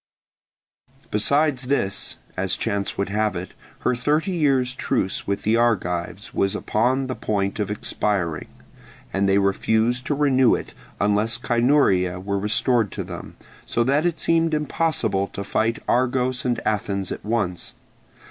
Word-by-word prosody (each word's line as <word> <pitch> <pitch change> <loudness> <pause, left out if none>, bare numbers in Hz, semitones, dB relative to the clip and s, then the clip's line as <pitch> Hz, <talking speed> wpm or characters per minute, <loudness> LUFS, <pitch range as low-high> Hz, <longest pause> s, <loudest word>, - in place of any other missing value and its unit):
Besides 135 +4 +2
this, 100 -8 -1 0.2
as - - -1
chance 100 -1 -2
would 100 - -1
have 105 -1 0
it, 90 +1 -5 0.3
her - - +2
thirty 150 +9 0
years' 135 -7 +2
truce 125 -7 -1
with 100 0 -1
the 110 +2 +3
Argives 95 -5 -1
was 95 0 +1
upon 125 +5 +1
the 130 - -3
point 100 -3 -2
of 105 -2 -1
expiring; 100 -5 -2 0.7
and 100 0 +2
they 95 - +4
refused 110 +5 +1
to 145 - +1
renew 130 -4 +4
it - - -7 0.3
unless 105 +3 +1
Cynuria 120 -8 +2
were 100 +1 -2
restored 110 +1 +1
to - - -3
them; - - -8 0.3
so 120 - 0
that 140 +7 +2
it 170 -2 -2
seemed 165 -1 +2
impossible 150 -10 0
to 100 - -4
fight 115 +3 0
Argos 125 0 +1
and 120 -1 +1
Athens 100 -2 -1
at - - -5
once. 100 -6 -2
115 Hz, 145 wpm, -23 LUFS, 100-130 Hz, 0.7 s, they